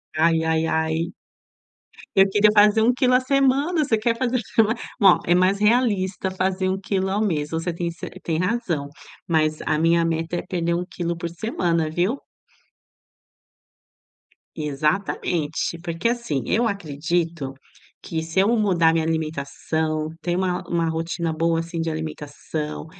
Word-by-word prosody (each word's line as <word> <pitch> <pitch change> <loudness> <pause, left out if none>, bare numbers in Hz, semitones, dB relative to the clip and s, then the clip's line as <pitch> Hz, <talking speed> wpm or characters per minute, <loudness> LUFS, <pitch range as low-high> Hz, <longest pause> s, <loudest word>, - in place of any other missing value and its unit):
Ai 160 +1 +3
ai 160 0 +1
ai. 160 +1 -1 1.0
Eu 195 0 +6
queria 210 +1 +4
fazer 210 +1 +5
1 245 +2 +4
quilo 255 -1 +3
à - - +6
semana, 275 +5 +2
você 245 -6 +1
quer 230 +2 +1
fazer 255 +1 0 0.6
olha, 195 -3 +7
é 175 - +3
mais 185 +2 +3
realista 205 -5 +1
fazer 185 0 -1
1 190 +1 -1
quilo 190 -1 -1
ao 200 +2 0
mês. 155 -8 0
Você 165 +1 -2
tem 170 0 -2
ce 170 - -7 0.2
tem 160 -2 -1
razão, 180 - -1 0.4
mas 155 -2 +1
a 155 - +1
minha 165 +1 +3
meta 165 +1 -2
é - - -2
perder 170 -2 -1
1 175 +1 -2
quilo 170 -1 -4
por 170 - -3
semana, 170 -4 -1
viu. 180 - 0 2.4
Exatamente. 155 +2 -1
Porque, 170 +5 -1
assim, 235 - -2
eu 230 +1 +2
acredito 165 -5 -2 0.5
que 160 -1 -3
se 160 +3 -1
eu 195 +3 +4
mudar 175 -6 +3
minha 160 -1 +1
alimentação, 155 0 -2
ter 175 0 -1
uma 180 -1 0
uma 165 -1 0
rotina 165 +1 -2
boa 165 +1 +1
assim 165 0 -6
de 165 - -1
alimentação, 155 -1 -5
170 Hz, 150 wpm, -23 LUFS, 160-200 Hz, 2.4 s, olha